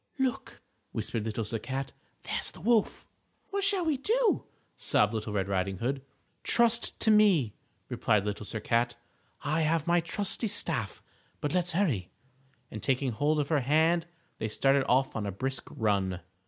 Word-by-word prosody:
"Look," 265 -2 -2 0.3
whispered 110 -2 -3
Little 110 0 -2
Sir 115 +1 -3
Cat, 135 +4 -4 0.3
"there's - - -2
the - - -13
wolf." 220 +4 +1 0.5
"What 400 0 -1
shall 395 -3 +2
we 310 -4 +1
do?" 455 - +1 0.3
sobbed 105 +1 +2
Little 110 -1 -3
Red 100 -2 -1
Riding 95 0 -1
Hood. 135 +6 -2 0.4
"Trust 235 0 +2
to 220 - +5
me," 190 - +4 0.3
replied 105 -2 +1 0.2
Sir 105 +2 -5
Cat, 115 +3 0 0.5
"I 155 +2 0
have 160 0 +1
my 175 0 +3
trusty 200 +6 +1
staff. - - +1 0.4
But 145 - -2
let's 175 -1 +2
hurry," 145 - 0 0.6
and 110 - -6
taking 130 -1 0
hold 150 +7 +1
of 145 - -1
her 155 -3 +3
hand 160 +5 +2 0.3
they 110 - -2
started 135 +4 +2
off 130 +2 +2
on 105 -2 -2
a - - -2
brisk 130 +5 -4
run. 95 -4 -1
140 Hz, 160 wpm, -29 LUFS, 110-180 Hz, 0.6 s, to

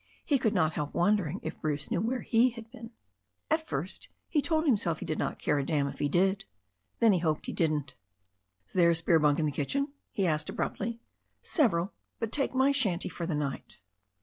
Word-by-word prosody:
He 285 -4 +2
could 220 -3 +1
not 155 0 +2
help 150 -1 -4
wondering 185 -1 +2
if - - -6
Bruce 150 -2 -2
knew 175 - +1
where 245 +4 -1
he 235 +2 +4
had 230 -1 -11
been. 230 -3 -10 0.6
At 320 0 +1
first - - -4 0.2
he 300 - +1
told 315 +2 +1
himself 200 - +2
he - - -6
did 155 - -2
not - - -1
care 145 - +1
a - - 0
damn 145 0 +1
if - - -7
he 145 - +1
did. 190 +5 +2 0.5
Then 225 -3 +6
he 180 - +2
hoped 155 -3 0
he - - -4
didn't. 150 -5 0 0.7
"Is - - -18
there 175 -2 +5
a 170 - +3
spare 165 0 +3
bunk 150 -1 +3
in 160 - +1
the 150 - 0
kitchen 275 - -1
?" - - -51
he 195 - 0
asked 155 -2 0
abruptly. 230 +2 -3 0.4
/'Several. 200 - +2 0.3
But 225 -2 -3
take 275 -1 0
my 265 +2 +4
shanty 215 -12 +1
for 170 -1 -5
the 165 - -1
night." 145 -2 -4
185 Hz, 215 wpm, -30 LUFS, 155-235 Hz, 0.7 s, Then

